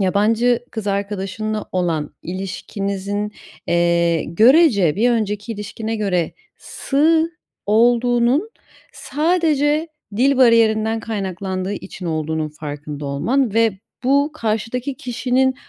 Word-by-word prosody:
yabancı 225 +5 +2
kız 220 -3 -5
arkadaşınla 200 +2 -2
olan 165 -5 -1
ilişkinizin, 200 +2 -4 0.4
eee, 170 -1 +2
görece 215 - +4
bir 240 +3 +3
önceki 210 -1 -1
ilişkine 220 +2 -5
göre 185 -5 0 0.2
sığ 320 +4 +1 0.4
olduğunun 240 - +3 0.4
sadece 310 0 +1 0.3
dil 270 +3 +3
bariyerinden 225 -2 +4
kaynaklandığı 190 -3 -3
için 185 -2 -8
olduğunun 155 -1 -2
farkında 150 -1 -7
olman 225 - 0
ve 225 -4 +2 0.3
bu 280 +3 +3
karşıdaki 230 +3 -2
kişinin 255 +2 0
215 Hz, 95 wpm, -20 LUFS, 190-245 Hz, 0.4 s, görece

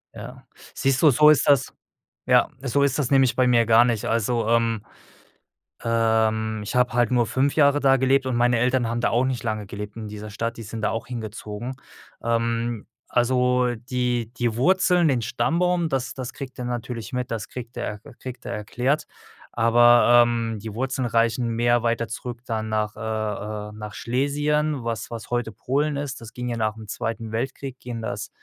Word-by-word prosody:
Ja. - - -10 0.3
Siehst 135 -1 +1
du, 155 - +7
so 150 +4 +6
ist 155 - +4
das 140 -3 +3 0.5
ja, - - +4
so 140 +2 +1
ist 140 0 +2
das 140 -3 0
nämlich 135 -2 +4
bei 130 -1 +3
mir 120 -2 +4
gar 115 +2 +5
nicht. 115 -3 -1
Also, 115 0 0
ähm, 115 -2 +2 1.0
ähm, 110 -1 +1
ich 105 - -5
habe 125 -1 +2
halt 120 -2 +2
nur 120 -2 +3
5 135 +5 0
Jahre 145 -1 +4
da 135 -1 +4
gelebt 130 +1 +2
und 125 - -1
meine 120 -1 +3
Eltern 125 -1 +1
haben 120 +1 -2
da - - +2
auch 120 +2 +2
nicht 125 -4 -2
lange 110 -2 -2
gelebt 105 +1 -7
in 110 -1 -6
dieser 105 0 -8
Stadt, 115 +3 -3
die - - -7
sind 110 +1 -7
da - - +1
auch 115 - -4
hingezogen. 110 0 -6 0.5
Ähm, 115 -1 -1 0.2
also 125 0 +2
die 120 -1 -2
die 120 -2 0
Wurzeln, 180 +4 +3
den 130 -4 +1
Stammbaum, 170 +6 +1
das 130 -4 -2
das 130 -2 -6
kriegt 135 -2 -9
er 125 - -3
natürlich 120 0 -5
mit, 125 -1 -3
das 110 -2 -3
kriegt 120 -1 -8
er 105 -4 -4
e 140 - -12
kriegt 130 -1 -8
er 120 - -4
erklärt, 125 +7 -1 0.5
aber, 120 +1 +6
ähm, 115 -2 -1
die 110 0 -7
Wurzeln 130 0 -1
reichen 115 +1 +1
mehr 120 +1 +2
weiter 115 0 0
zurück 120 0 -6
dann 110 -1 -3
nach, 105 -1 -1
äh 105 -1 -4
äh - - -11
nach 105 -1 -8
Schlesien, 145 +2 0
was 115 -3 -3
was 115 0 -8
heute 120 -2 -1
Polen 145 +8 -1
ist. 140 -4 -5
Das 115 - -11
ging 125 0 -4
ja 120 - -2
nach 110 -1 -1
'm 110 - -9
Zweiten 115 +1 -4
Weltkrieg 130 +3 -4
ging 120 -2 -6
das - - -4
120 Hz, 190 wpm, -24 LUFS, 115-130 Hz, 1.0 s, du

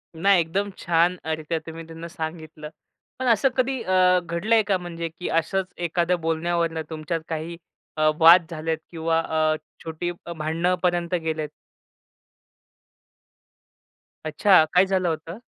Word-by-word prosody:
नाही, 195 +3 +4
एकदम 195 +5 -2
छान 170 +1 +2
अ, 160 - -2
रीत्या 160 +1 -3
तुम्ही 165 0 -7
त्यांना 165 +1 -8
सांगितलं. 160 -2 -7 0.5
पण 260 - -2
असं 235 +3 +4
कधी 260 0 0
अ, 185 -1 +4
घडलंय 180 +6 +1
का 195 -2 +2
म्हणजे 170 -2 -5
की 180 +3 -6
असंच 190 +4 -2 0.2
एखाद्या 175 +2 +1
बोलण्यावरनं 165 0 -1
तुमच्यात 160 +1 -3
काही 165 +1 -4 0.4
अ, 155 0 +4
वाद 170 +2 +8
झालेत 160 0 -2
किंवा 165 -1 0
अ, 155 -1 +1 0.3
छोटी 165 +2 -4 0.3
भांडणांपर्यंत 175 +2 0
गेलेत? 155 -2 -2 2.8
अच्छा. 160 +3 +5
काय 180 +2 +6
झालं 190 -2 0
होतं? 165 +4 -5
165 Hz, 125 wpm, -24 LUFS, 160-180 Hz, 2.8 s, वाद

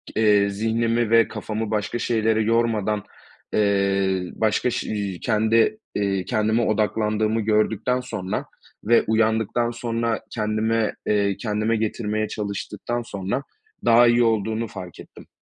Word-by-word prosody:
iii, 110 - +1
eee, 100 -1 +4
zihnimi 115 +2 0
ve 115 -1 +5
kafamı 110 0 -4
başka 110 +2 -1
şeylere 110 -1 +1
yormadan, 110 -2 +1 0.5
eee, 100 -2 +2
başka 110 +2 +1
ş - - -3
iii, 100 -4 -3
kendi, 115 - +2 0.2
eee, 100 -2 0
kendime 110 0 +1
odaklandığımı 110 +1 0
gördükten 110 +3 +1
sonra 100 -7 -4 0.4
ve 115 +2 +4
uyandıktan 110 +1 +1
sonra 115 -1 -2
kendime, 110 0 0
eee, 100 -2 +1
kendime 110 +1 -1
getirmeye 110 0 -1
çalıştıktan 105 +3 -4
sonra 100 +4 -4 0.4
daha 120 +1 +6
iyi 120 0 +4
olduğunu 110 0 0
fark 90 -4 -9
ettim. - - -13
110 Hz, 125 wpm, -23 LUFS, 105-115 Hz, 0.5 s, daha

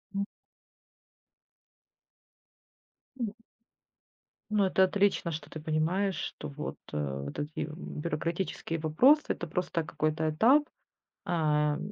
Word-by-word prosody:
М. 200 0 0 2.9
М. 225 -4 -1 1.2
Ну 210 -1 +3
это 190 0 +4
отлично, 195 -3 +2
что 155 - -6
ты 155 - -7
понимаешь, 160 +6 +1
что - - -5
вот, 150 +1 -5 0.2
э, 70 -2 -2
вот 70 - -6
эти 150 +1 -3
бюрократические 165 +1 -3
вопросы- 255 - +5
это - - -1
просто 170 0 -1
какой-то 155 0 0
этап, 240 - +5 0.6
а, 150 -3 +2
165 Hz, 100 wpm, -30 LUFS, 150-190 Hz, 2.9 s, вопросы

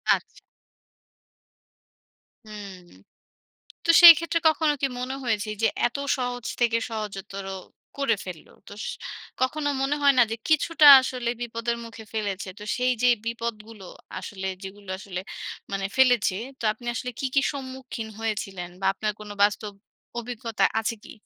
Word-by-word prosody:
আচ্ছা। - - -11 2.1
হুম। 205 -3 -9 1.1
তো - - -3
সেইক্ষেত্রে 335 0 +9
কখনো 315 -1 +2
কি 275 - +3
মনে 255 +2 -3
হয়েছে 220 -3 -1
এই - - -12
যে - - +6 0.2
এত 240 - -7 0.2
সহজ 245 -2 -3 0.2
থেকে 235 -1 +3
সহজতর 200 -3 -6 0.5
করে 275 -4 +2
ফেলল 180 -4 -8 0.2
তোস 205 +2 -8 0.6
কখনো 290 +3 0
মনে 275 +2 +1
হয় 280 -1 +6
না 245 - +8
যে - - 0
কিছুটা 310 0 +5
আসলে 250 -2 -3
বিপদের 235 0 -2
মুখে 230 -1 -10
ফেলেছে? 205 -3 -3
তো - - -8
সেই 250 0 +2
যেই 250 -1 +5
বিপদগুলো 230 -3 -5 0.3
আসলে 190 0 -6 0.2
যেগুলো 195 0 -10
আসলে 190 -2 -6 0.5
মানে 195 0 -2
ফেলেছে, 245 -7 +4 0.2
তো - - -9
আপনি 240 +3 -15
আসলে 250 +2 -3
কি, - - -2
কি 275 - +5
সম্মুখীন 260 -4 -6
হয়েছিলেন, 195 -5 -3
বা - - -2
আপনার 210 +2 -2
কোনো 210 -1 -8
বাস্তব 205 +1 +2 0.5
অভিজ্ঞতা 235 -2 -3 0.2
আছে 225 +1 -2
কি? - - -12
230 Hz, 140 wpm, -25 LUFS, 205-260 Hz, 2.1 s, সেইক্ষেত্রে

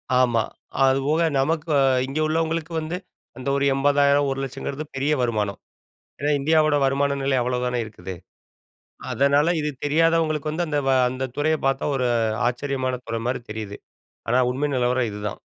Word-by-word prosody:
ஆமா, 120 -3 +3 0.4
அதுபோக 135 +4 +2 0.2
நமக்கு 155 +3 0 0.4
இங்கே 140 +4 -2
உள்ளவங்களுக்கு 160 +1 -1
வந்து, 160 +3 -4 0.4
அந்த 130 - -7
ஒரு 140 0 +1
ரூ.80,000 140 +1 +3
ரூ.100000 135 +2 -4
பெரிய 140 +3 +1
வருமானம். 105 -4 -1 0.6
ஏன்னா, 145 +1 +1
இந்தியாவோட 155 +1 +3
வருமான 140 +1 +1
நிலை 135 0 +1
அவ்வளோ 125 +1 -1
தானே 125 0 -1
இருக்குது. 95 -3 -8 1.0
அதனால 145 +5 +3
இது 150 0 -1
தெரியாதவங்களுக்கு 155 0 +2
வந்து 170 +3 -2
அந்த 150 -1 0
வ - - +4 0.2
அந்த 130 +1 -4
துறையை 155 +2 +1
பார்த்தா 135 0 +1
ஒரு 125 -1 0 0.4
ஆச்சரியமான 130 0 -2
துறை 115 0 -3
மாரி 125 +1 -1
தெரியுது. 105 -2 -6 0.5
ஆனா, 125 +2 +3
உண்மை 140 +4 -1
நிலவரம் 125 -1 +1
இதுதான். 105 0 -5
140 Hz, 145 wpm, -23 LUFS, 125-155 Hz, 1.0 s, வ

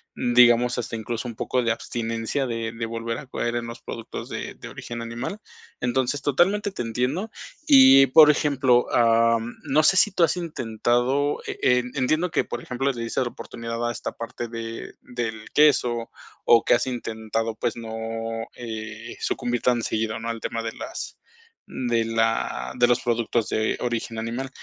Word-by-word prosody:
digamos, 120 0 +4
hasta 120 -1 -3
incluso 115 +2 -4
un 120 - -6
poco 125 +3 0
de 115 -1 +1
abstinencia 115 +3 -3
de 115 -1 -3
de 115 0 -4
volver 115 0 -4
a - - -9
caer 120 -1 -2
en 120 0 -4
los 115 0 -8
productos 115 -2 -7
de - - -5
de - - -10
origen 120 0 -7
animal. 120 - -5 0.4
Entonces, 130 +2 0
totalmente 185 +9 +2
te 190 - -5
entiendo. 125 - -1 0.4
Y 265 - +8
por 150 +3 +8
ejemplo, 135 -4 +2
am, 115 0 +3
no 150 +1 +2
sé, 195 - +5
si 210 - +5
tú 180 - +2
has 165 +2 +2
intentado, 130 -2 0
e - - -6
e 125 0 +4 0.2
entiendo 155 +6 +1
que, - - +1
por 120 - -5
ejemplo, 135 +2 -1
le 120 - -6
diste 115 - -2
la 125 - 0
oportunidad 115 0 -5
a 120 - 0
esta 115 - -5
parte 115 +1 -6
de 115 0 -7
del 110 -3 -5
queso, 125 -6 +3 0.4
o 115 -1 +6
que - - +3
has 120 - -1
intentado, 115 -2 -3
pues - - -2
no, 115 0 -5
eh, 110 -1 -7
sucumbir 120 -1 -2
tan 125 -1 +2
seguido, 110 0 -1
¿no?, 115 - -4
al 115 -1 -3
tema 115 0 -3
de 115 - -3
las, 335 +2 -7 0.5
mm, 125 - -4
de 115 -1 +2
la 115 - -1
de 120 - +6
los 120 0 +3
productos 120 -1 0
de 110 0 0
origen 115 -1 -3
animal. 120 +4 -4
120 Hz, 180 wpm, -24 LUFS, 115-130 Hz, 0.5 s, Y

